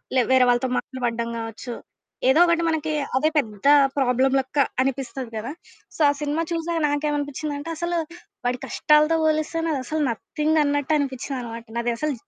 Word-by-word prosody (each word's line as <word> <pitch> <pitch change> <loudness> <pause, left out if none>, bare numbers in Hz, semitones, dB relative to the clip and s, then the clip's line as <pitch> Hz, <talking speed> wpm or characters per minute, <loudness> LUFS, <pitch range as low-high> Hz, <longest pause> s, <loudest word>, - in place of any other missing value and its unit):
లే 255 - +5
వేరే 260 -1 +6
వాళ్ళతో 245 +1 +2
మాటలు 260 0 -4
పడడం 235 0 -1
గావచ్చు, 225 +2 -6 0.6
ఏదో 270 +5 +5
ఒకటి 340 -1 +2
మనకీ 315 -1 -1 0.2
అదే 305 +4 +3
పెద్ద 215 -4 -1 0.3
ప్రాబ్లమ్ 260 0 +2
లెక్క 265 +2 -5 0.3
అనిపిస్తది 265 -2 -3
కదా! 225 +5 -4 0.4
సో, - - -13
ఆ - - +4
సినిమా 295 +2 -1
చూశాక 335 0 -1
నాకేవనిపిచ్చిందంటే, 290 +1 -2
అసలు 345 +1 -1 0.5
వాడి 245 0 0
కష్టాలతో 305 +2 +3
బోలిస్తే, 310 +1 0
నాదసలు 305 0 -1
నథింగన్నట్టు 300 +3 0
అనిపిచ్చిందనమాట. 250 -4 -4
నాది 235 0 0
అసలు 305 +3 -1
285 Hz, 140 wpm, -23 LUFS, 250-310 Hz, 0.6 s, వేరే